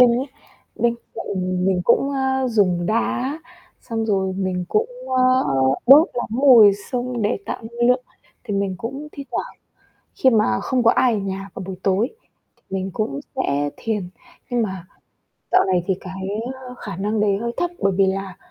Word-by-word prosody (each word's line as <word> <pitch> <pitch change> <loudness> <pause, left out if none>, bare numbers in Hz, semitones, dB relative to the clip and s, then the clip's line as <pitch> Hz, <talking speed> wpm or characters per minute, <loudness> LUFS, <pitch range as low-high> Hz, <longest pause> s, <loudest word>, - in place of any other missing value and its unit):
linh 245 -1 +7
ấy, 265 - -2 0.5
bên 235 +1 +2 0.2
cạnh 185 -2 -2
mình 185 -2 +2
cũng, 275 +4 +3
a, 265 -1 0
dùng 185 -6 +2
đá, 245 - 0 0.4
xong 225 -2 -3
rồi 190 -2 0
mình 185 -2 -1
cũng, 450 +3 +1 0.3
a, 255 - +4 0.6
đốt 290 +7 +8
lắm 240 - -2
mùi 235 -5 +7 0.2
xông 245 -2 -2
để 205 0 +1
tạo - - -4
năng 240 +2 -1
lượng. 250 0 +2 0.4
Thì 210 -4 -3
mình 195 -1 -1
cũng 275 +6 -6
thi 280 - -7
thoảng - - -3 0.6
khi 260 - +4
mà 210 - +2
không 255 -2 0
có 230 - +6
ai 250 -3 +3
ở 210 - 0
nhà 195 0 -5
vào 190 - -6
buổi 190 - -5
tối 200 +6 +2 0.5
thì - - -36
mình 190 0 -3
cũng 140 -11 -2 0.2
sẽ 145 +1 0
thiền. 210 -5 -3 0.4
Nhưng 245 -2 +1
mà 190 -4 -4 0.7
dạo - - +5
này 180 -2 +1
thì 190 - +3
cái, 190 0 -6 0.3
ơ, 255 -1 -10
khả - - -7
năng 210 +2 -1
đấy 205 -2 +2
hơi 235 +3 -3
thấp, 350 - 0
bởi 195 -1 +2
vì 195 -1 +4
là 195 -1 -3
215 Hz, 185 wpm, -21 LUFS, 190-250 Hz, 0.7 s, đốt